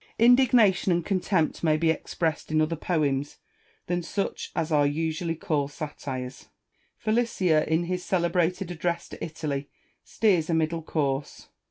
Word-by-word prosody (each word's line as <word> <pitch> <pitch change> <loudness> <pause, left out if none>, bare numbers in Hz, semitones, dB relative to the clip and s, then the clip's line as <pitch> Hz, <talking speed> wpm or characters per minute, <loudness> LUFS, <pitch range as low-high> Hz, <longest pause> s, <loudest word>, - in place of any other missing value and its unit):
Indignation 235 -6 +5
and 170 -1 +1
contempt 185 -5 0
may 155 -2 +3
be 160 0 +3
expressed 160 0 -2
in 155 - +3
other 155 +2 +1
poems 145 -4 -1 0.5
than 175 0 -1
such 195 +4 -3
as 160 0 -1
are 145 -2 +4
usually 165 +3 -1
called 145 -3 -1
satires. 135 -4 -6 0.5
Filicaia, 215 -8 +2
in 160 +2 +2
his 180 +1 -3
celebrated 180 0 0
address 170 0 -2
to - - -8
Italy, 150 -3 -4 0.3
steers 180 -8 +1
a 165 - +2
middle 160 +1 0
course. 145 -3 -2
165 Hz, 140 wpm, -26 LUFS, 155-180 Hz, 0.5 s, Indignation